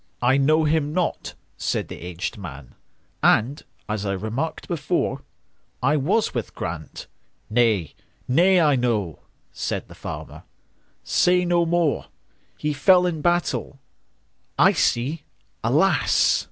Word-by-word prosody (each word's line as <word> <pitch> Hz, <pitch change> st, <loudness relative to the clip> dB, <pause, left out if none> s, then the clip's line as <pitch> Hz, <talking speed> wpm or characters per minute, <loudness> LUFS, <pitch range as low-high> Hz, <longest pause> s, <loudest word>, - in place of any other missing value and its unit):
"I 130 Hz, +2 st, +4 dB
know 155 Hz, +3 st, +3 dB
him 150 Hz, -1 st, +1 dB
not," 180 Hz, 0 st, -2 dB, 0.2 s
said -, -, -2 dB
the -, -, -9 dB
aged 90 Hz, +5 st, -5 dB
man,"And, 95 Hz, -, -2 dB, 0.3 s
as 105 Hz, -1 st, -3 dB
I 100 Hz, -1 st, -1 dB
remarked 110 Hz, -, -4 dB
before,I 150 Hz, -3 st, -3 dB
was 175 Hz, +10 st, +1 dB
with 120 Hz, -4 st, -4 dB
Grant"—"Nay, 90 Hz, -, -3 dB, 0.3 s
nay, 180 Hz, +8 st, +4 dB
I 150 Hz, -4 st, +4 dB
know,"Said 110 Hz, -, -3 dB
the -, -, -11 dB
farmer, -, -, -8 dB, 0.6 s
"say 180 Hz, 0 st, +3 dB
no 175 Hz, -1 st, +2 dB
more:"He 165 Hz, -2 st, -3 dB
fell 180 Hz, +6 st, +5 dB
in 165 Hz, -4 st, -2 dB
battle,—I 175 Hz, -5 st, -1 dB
see, 140 Hz, +7 st, 0 dB, 0.4 s
alas! -, -, +3 dB
140 Hz, 100 wpm, -23 LUFS, 110-170 Hz, 0.6 s, fell